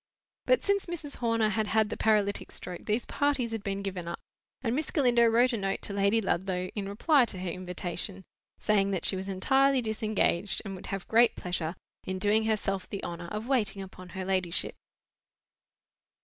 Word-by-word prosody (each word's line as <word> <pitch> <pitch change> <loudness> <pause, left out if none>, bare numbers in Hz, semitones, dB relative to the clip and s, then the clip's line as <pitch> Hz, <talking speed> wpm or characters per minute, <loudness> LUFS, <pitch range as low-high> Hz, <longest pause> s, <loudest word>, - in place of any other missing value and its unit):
But - - +4
since 400 -1 +1
Mrs. 310 -5 -6
Horner 230 -2 +2
had 215 +1 0
had 220 -1 +2
the - - -1
paralytic 210 -2 +1
stroke 180 -1 -7
these 220 +3 +1
parties 280 -5 0
had 225 -2 -4
been 200 0 -3
given 185 -3 -4
up; 170 - -3 0.5
and 235 -1 0
Miss 305 +2 -2
Galindo 240 -5 +4
wrote 240 +3 +4
a - - 0
note 195 -1 -2
to 200 - -3
Lady 200 +3 +3
Ludlow 185 -1 -1
in 200 -2 -4
reply 260 +6 +4
to 205 - -3
her 180 -1 -3
invitation, 185 +1 -5 0.3
saying 200 -2 +2
that 190 -3 -1
she - - +4
was 190 +1 -4
entirely 265 +8 +3
disengaged, 215 -4 +1
and 195 - -5
would 185 - -9
have 195 -2 -4
great 235 +1 +5
pleasure 175 -1 -3 0.3
in 185 0 -3
doing 210 +3 +2
herself 195 -3 -1
the 200 - -5
honour 175 0 -5
of 210 +4 -4
waiting 215 -7 0
upon 185 -1 -11
her 190 - -3
ladyship. 185 -2 +1
205 Hz, 185 wpm, -29 LUFS, 190-230 Hz, 0.5 s, great